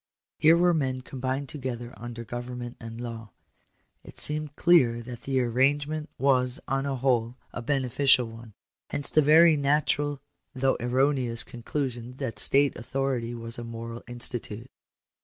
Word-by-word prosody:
Here 160 +2 +6
were 175 0 +4
men 130 -5 -1
combined 130 +2 -3
together 125 -4 -5
under 120 0 -7
government 120 +1 -6
and 115 0 -8
law. 115 -2 -6 0.7
It - - -13
seemed 150 -1 +1
clear 125 -10 +4
that 120 0 -8
the 135 -1 0
arrange 135 +4 +2
ment 155 0 -4
was 125 -1 +2
on 135 0 0
the 140 -1 -1
whole 125 -2 0 0.2
a - - -4
beneficial 130 0 +2
one. 115 -1 -11 0.3
Hence 145 - -3
the 155 - +5
very 160 +2 +7
natural, 145 0 +1 0.4
though 130 0 +2
erroneous, 125 -1 +1
conclusion 120 0 -5
that 115 -7 -3
state 140 +5 +4
authority 120 -1 -2
was 115 0 -4
a - - -5
moral 115 0 -7
institute. 120 -1 -2
130 Hz, 145 wpm, -27 LUFS, 120-140 Hz, 0.7 s, very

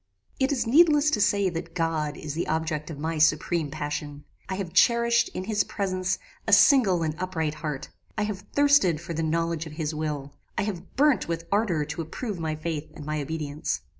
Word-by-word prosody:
"It 265 +1 +2
is 270 -4 0
needless 300 +3 +5
to 210 - +1
say 200 -1 +3
that 170 0 -6
God 160 -3 -1
is 150 -2 -5
the 165 - -2
object 160 -1 -2
of 155 - -6
my 160 +2 -2
supreme 155 0 +2
passion. 145 -1 -5 0.3
I 190 - -1
have 185 -4 -5
cherished, 235 0 +4
in 185 - -3
his 205 0 +1
presence, 185 -1 -1 0.3
a - - +2
single 200 - +6
and 155 -1 -1
upright 165 -5 -1
heart. 150 -3 -5 0.3
I 210 - +1
have 210 -2 -3 0.2
thirsted 285 - +4
for 170 +1 -6
the 165 - -2
knowledge 165 0 -1
of 155 - -10
his 155 -1 -3
will. 150 -2 -4 0.2
I - - +1
have 200 -5 -5
burnt 290 0 +3
with 165 0 -3
ardour 195 -7 +1
to 150 +3 -4
approve 195 +4 -5
my 160 -1 -2
faith 155 -1 -4
and 150 -2 -9
my 155 0 -2
obedience. 150 0 -3
165 Hz, 195 wpm, -26 LUFS, 155-200 Hz, 0.3 s, single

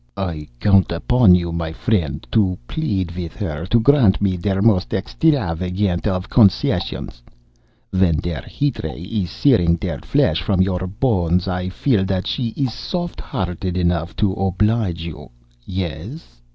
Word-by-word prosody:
I 85 -6 -4
count 100 -3 +4
upon 95 +3 +4
you, 85 -1 -1
my 85 -1 -3
friend, 85 - -1
to 95 -5 +2
plead 95 - -2
with 85 -5 -5
her 80 +2 -4
to 115 +4 +3
grant 120 -5 +4
me 100 -2 +1
der 95 +2 -1
most 100 -3 +3
extrafagant 95 - 0
of 90 -2 -1
concessions, 95 - +1 0.7
when 95 -3 +3
der 85 -5 -3
heat 145 -1 -2
ray 80 0 -5
is 100 -2 -2
searing 85 - +3
der 85 - -4
flesh 80 +2 +1
from 95 +1 0
your 95 -1 +1
bones. 90 -5 0
I 90 0 -2
feel 105 +1 +1
that 95 -1 -1
she 125 -4 -1
is 135 -5 0
soft 175 +8 -4
hearted 90 0 -3
enough 85 -1 0
to 100 -3 +1
oblige 95 -2 0
you. 85 -3 -8 0.4
Yes?" 90 - -6
95 Hz, 150 wpm, -20 LUFS, 85-105 Hz, 0.7 s, count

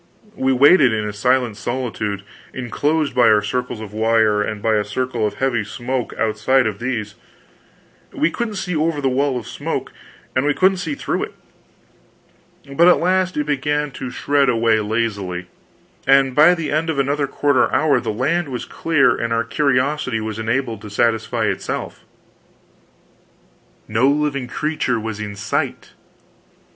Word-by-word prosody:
We 135 -7 +1
waited 140 +1 +6
in 110 -1 -1
a 105 - -5
silent 125 0 +1
solitude 110 -5 -3 0.3
enclosed 145 +5 -1
by 125 -2 +4
our 105 -1 +4
circles 125 +2 -3
of 105 -2 -9
wire, 110 -1 +2
and 105 0 -3
by 110 +2 +1
a 105 -1 +2
circle 120 +1 -2
of - - -6
heavy 130 -5 0
smoke 125 +3 -4
outside 115 +4 +2
of 105 -3 -2
these. 115 -4 -3 1.0
We 155 - 0
couldn't 225 +1 -3
see 190 -2 -3
over 155 0 0
the 135 -2 +1
wall 135 0 0
of 120 - -6
smoke, - - -4 0.4
and 130 - +2
we 145 0 +1
couldn't 190 +1 +3
see 165 -5 -3
through - - -2
it. - - -16 1.4
But 170 +4 +5
at 180 - +6
last 185 0 +1
it 150 - 0
began 150 0 -1
to 130 -1 -6
shred 140 +1 +1
away 115 -2 +2
lazily, 100 -5 -2 0.6
and 135 -1 +4
by 155 +6 +6
the 165 -3 -4
end 155 +2 0
of 160 - -1
another 140 +1 0
quarter 140 -2 +1
hour 145 -4 +3
the 115 -2 -3
land 145 +8 0
was 125 -2 -4
clear 165 -4 +2
and 115 0 -3
our 115 0 +1
curiosity 130 -1 0
was 110 0 -5
enabled 115 -1 -2
to 105 - -9
satisfy 110 +2 0
itself. - - -4 1.8
No 110 +5 +2
living 140 -3 0
creature 150 -4 -1
was 110 -1 -5
in 105 -1 -5
sight! 100 - -3
125 Hz, 160 wpm, -20 LUFS, 110-145 Hz, 1.8 s, waited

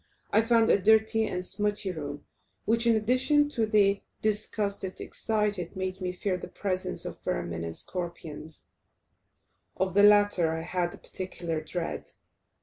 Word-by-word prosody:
I 215 - +5
found 230 0 +4
a 200 - +4
dirty 220 +1 +4
and 180 0 -3
smutty 205 0 -1
room, 145 -4 -6 0.4
which, 230 +1 +2
in 230 - +5
addition 255 +7 +3
to 230 -6 0
the 200 -2 +3 0.2
disgust 210 -1 0
it 190 -1 -5
excited, 210 -5 -1
made 190 0 -3
me 180 -1 -1
fear 180 +1 -2
the - - -7
presence 185 -2 -2
of - - -7
vermin 85 -1 -3
and 85 -1 -4
scorpions; 165 -3 -5 1.1
of 190 -1 0
the 200 - +5
latter 205 -5 +5
I 165 - -3
had 175 0 -1
a - - -15
particular 170 -4 -4
dread. 170 +2 -5
195 Hz, 150 wpm, -28 LUFS, 175-215 Hz, 1.1 s, I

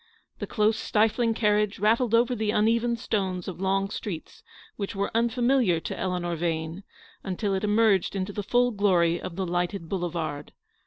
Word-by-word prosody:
The - - -4
close, 215 0 +1
stifling 225 +2 +1
carriage 210 -2 +1
rattled 225 +3 +2
over 240 +2 +3
the 220 -3 -1
uneven 230 +3 +2
stones 190 -6 -2
of 185 -1 -6
long 195 +1 0
streets 185 -8 -6 0.3
which 200 -1 -4
were 200 +1 -1
un 235 +1 +3
familiar 240 -7 +2
to - - -5
Eleanor 180 -2 -2
Vane, 165 +1 -2 0.4
until 195 +1 -2
it 190 +1 -1
emerged 210 -3 +2
into 195 +1 -3
the 205 - -3
full 245 +4 +2
glory 180 -5 +2
of 170 - -6
the 190 +1 -2
lighted 175 0 -2
Boulevard. 165 -6 -3
200 Hz, 165 wpm, -26 LUFS, 180-225 Hz, 0.4 s, over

